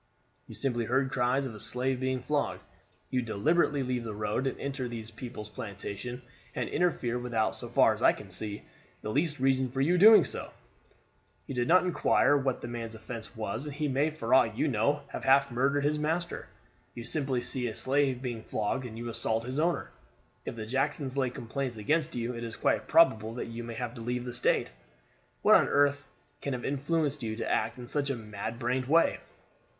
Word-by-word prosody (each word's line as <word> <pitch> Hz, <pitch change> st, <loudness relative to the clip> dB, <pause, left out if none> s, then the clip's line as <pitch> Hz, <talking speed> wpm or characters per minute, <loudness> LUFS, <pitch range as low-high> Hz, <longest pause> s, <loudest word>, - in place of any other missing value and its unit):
You -, -, -10 dB
simply 120 Hz, -4 st, 0 dB
heard 130 Hz, +3 st, +1 dB
cries 135 Hz, 0 st, +1 dB
of 125 Hz, -, -5 dB
a 105 Hz, -, -10 dB
slave 125 Hz, +4 st, -1 dB
being 130 Hz, -1 st, -1 dB
flogged. 150 Hz, 0 st, -1 dB, 0.5 s
You 130 Hz, -, +1 dB
deliberately 140 Hz, +6 st, +1 dB
leave 125 Hz, -1 st, -2 dB
the 110 Hz, -2 st, -5 dB
road 105 Hz, +5 st, -1 dB
and 135 Hz, -, -3 dB
enter 135 Hz, -2 st, -3 dB
these 115 Hz, -2 st, -7 dB
people's 120 Hz, -4 st, -7 dB
plantation 105 Hz, +4 st, -6 dB, 0.3 s
and -, -, -1 dB
interfere 125 Hz, -9 st, 0 dB
without, 115 Hz, -3 st, 0 dB
so -, -, -4 dB
far -, -, +5 dB
as -, -, -8 dB
I -, -, +7 dB
can 95 Hz, -, -10 dB
see, 105 Hz, +3 st, -4 dB, 0.4 s
the 105 Hz, -, -3 dB
least 150 Hz, +3 st, 0 dB
reason 130 Hz, 0 st, +2 dB
for 135 Hz, +2 st, 0 dB
doing 180 Hz, +8 st, +8 dB
so. -, -, -4 dB, 1.0 s
You 140 Hz, -, -6 dB
did 120 Hz, -1 st, 0 dB
not 180 Hz, +2 st, +6 dB
inquire 170 Hz, -4 st, +3 dB
what 135 Hz, -3 st, 0 dB
the -, -, -5 dB
man's 115 Hz, -1 st, -5 dB
offense 115 Hz, +1 st, -7 dB
was; 110 Hz, +5 st, -4 dB
and 145 Hz, -, -6 dB
he 150 Hz, 0 st, -1 dB
may 140 Hz, +3 st, +2 dB
for 130 Hz, -7 st, -2 dB
aught 115 Hz, -4 st, +4 dB
you -, -, +2 dB
know 140 Hz, +4 st, +1 dB
have -, -, -6 dB
half 135 Hz, 0 st, +4 dB
murdered 140 Hz, +4 st, +1 dB
his 150 Hz, +1 st, +1 dB
master. 165 Hz, +3 st, -2 dB, 0.5 s
You 120 Hz, -, -6 dB
simply 130 Hz, -1 st, -1 dB
see 125 Hz, 0 st, -1 dB
a 110 Hz, -, -5 dB
slave 135 Hz, -1 st, +1 dB
being 120 Hz, -3 st, -3 dB
flogged 110 Hz, +4 st, -2 dB
and 110 Hz, -1 st, -9 dB
you 120 Hz, +1 st, -5 dB
assault 115 Hz, -1 st, -1 dB
his 130 Hz, +4 st, -3 dB
owner. 165 Hz, -2 st, 0 dB, 0.6 s
If -, -, -3 dB
the 110 Hz, -1 st, -5 dB
Jacksons 135 Hz, +2 st, -1 dB
lay 135 Hz, -2 st, +1 dB
complaints 120 Hz, +1 st, -4 dB
against 155 Hz, +9 st, 0 dB
you 120 Hz, +1 st, -2 dB
it 115 Hz, 0 st, -6 dB
is 115 Hz, -1 st, -5 dB
quite -, -, +1 dB
probable 115 Hz, -9 st, +4 dB
that 120 Hz, -, -4 dB
you 115 Hz, +1 st, -6 dB
may 115 Hz, 0 st, -6 dB
have 120 Hz, -1 st, -4 dB
to 115 Hz, -, -9 dB
leave 125 Hz, +1 st, -2 dB
the 125 Hz, -, -5 dB
state. 120 Hz, -, +1 dB, 0.7 s
What -, -, +7 dB
on -, -, +6 dB
earth 145 Hz, 0 st, +2 dB, 0.3 s
can 140 Hz, -, -2 dB
have 125 Hz, -, -4 dB
influenced 145 Hz, +1 st, 0 dB
you 110 Hz, -2 st, -3 dB
to 115 Hz, -, -3 dB
act 115 Hz, +2 st, 0 dB
in 125 Hz, -1 st, -8 dB
such 140 Hz, +1 st, -1 dB
a 135 Hz, -, 0 dB
mad 110 Hz, 0 st, -6 dB
brained 125 Hz, +2 st, -1 dB
way?" 165 Hz, +4 st, +4 dB
125 Hz, 205 wpm, -30 LUFS, 115-140 Hz, 1.0 s, doing